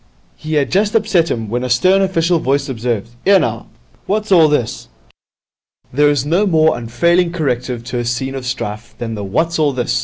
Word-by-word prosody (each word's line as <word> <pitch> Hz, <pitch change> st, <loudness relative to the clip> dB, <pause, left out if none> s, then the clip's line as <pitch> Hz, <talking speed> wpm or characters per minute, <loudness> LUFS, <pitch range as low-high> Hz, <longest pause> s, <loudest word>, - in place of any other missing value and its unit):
He 155 Hz, 0 st, -5 dB
had 140 Hz, -3 st, +1 dB
just 205 Hz, +3 st, +1 dB
upset 195 Hz, -6 st, +2 dB
him, 115 Hz, -2 st, -3 dB
when 120 Hz, +4 st, -2 dB
a 125 Hz, -, -3 dB
stern 185 Hz, +11 st, +3 dB
official 175 Hz, -3 st, +1 dB
voice 140 Hz, 0 st, 0 dB
observed, 115 Hz, -4 st, -3 dB
''Ere, 195 Hz, +1 st, +5 dB
now, -, -, -3 dB, 0.4 s
what's 215 Hz, +1 st, -1 dB
all 165 Hz, -4 st, +6 dB
this?' 135 Hz, -7 st, -2 dB, 1.1 s
There 145 Hz, +2 st, +4 dB
is 145 Hz, -2 st, 0 dB
no 175 Hz, +7 st, +1 dB
more 160 Hz, -3 st, +3 dB
unfailing 170 Hz, +10 st, +1 dB
corrective 125 Hz, -7 st, -2 dB
to 125 Hz, 0 st, -4 dB
a 120 Hz, -, -3 dB
scene 120 Hz, +3 st, -2 dB
of 130 Hz, -2 st, -6 dB
strife 110 Hz, -2 st, -5 dB
than 115 Hz, -1 st, -5 dB
the 105 Hz, -2 st, -5 dB
'What's 160 Hz, -, -1 dB
all 150 Hz, -3 st, +2 dB
this?' 125 Hz, 0 st, -1 dB
145 Hz, 190 wpm, -17 LUFS, 120-170 Hz, 1.1 s, all